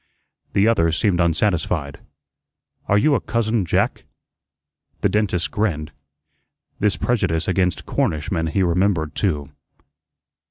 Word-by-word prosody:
The 100 Hz, +2 st, +3 dB
other 85 Hz, -8 st, +3 dB
seemed 90 Hz, +2 st, +1 dB
unsatisfied. 85 Hz, -4 st, 0 dB, 0.9 s
"Are 100 Hz, -, +3 dB
you 145 Hz, +8 st, +3 dB
a 135 Hz, -, +1 dB
'cousin 110 Hz, -2 st, 0 dB
Jack'?" 80 Hz, -, 0 dB, 1.0 s
The -, -, +3 dB
dentist 100 Hz, -5 st, 0 dB
grinned. 80 Hz, -8 st, -1 dB, 0.9 s
This 105 Hz, -1 st, +1 dB
prejudice 90 Hz, -9 st, 0 dB
against 90 Hz, -1 st, 0 dB
Cornishmen 80 Hz, +2 st, -1 dB
he 95 Hz, +4 st, +1 dB
remembered 90 Hz, -3 st, +1 dB
too. 75 Hz, -8 st, -1 dB
90 Hz, 110 wpm, -21 LUFS, 80-105 Hz, 1.0 s, The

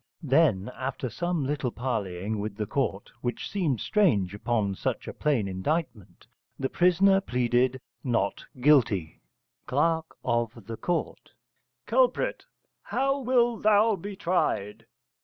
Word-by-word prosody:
Then 135 Hz, -, +3 dB
after 130 Hz, -2 st, -4 dB
some 175 Hz, -4 st, -1 dB
little 140 Hz, -2 st, -1 dB
parleying 110 Hz, -5 st, -3 dB
with 105 Hz, 0 st, -4 dB
the 105 Hz, -, -1 dB
court 105 Hz, -4 st, -2 dB
(which 120 Hz, -2 st, -3 dB
seemed 160 Hz, -, 0 dB
strange 110 Hz, -, +2 dB
upon 105 Hz, -1 st, 0 dB
such -, -, -3 dB
a -, -, -5 dB
plain 135 Hz, -9 st, 0 dB
indictment) 105 Hz, -, -3 dB, 0.3 s
the 135 Hz, -, -2 dB
prisoner 190 Hz, +2 st, +4 dB
pleaded 125 Hz, -2 st, +1 dB, 0.2 s
Not 115 Hz, -6 st, 0 dB, 0.2 s
Guilty. 115 Hz, -, +3 dB, 0.5 s
Cl. 160 Hz, +4 st, +2 dB, 0.2 s
of 120 Hz, -2 st, 0 dB
Ct. 115 Hz, -, -4 dB, 0.5 s
Culprit. -, -, +1 dB, 0.4 s
How 275 Hz, +1 st, 0 dB
wilt 240 Hz, -3 st, +2 dB
thou 215 Hz, +1 st, +4 dB
be 200 Hz, +2 st, -7 dB
tried? 115 Hz, -, -1 dB
130 Hz, 120 wpm, -27 LUFS, 110-175 Hz, 0.5 s, prisoner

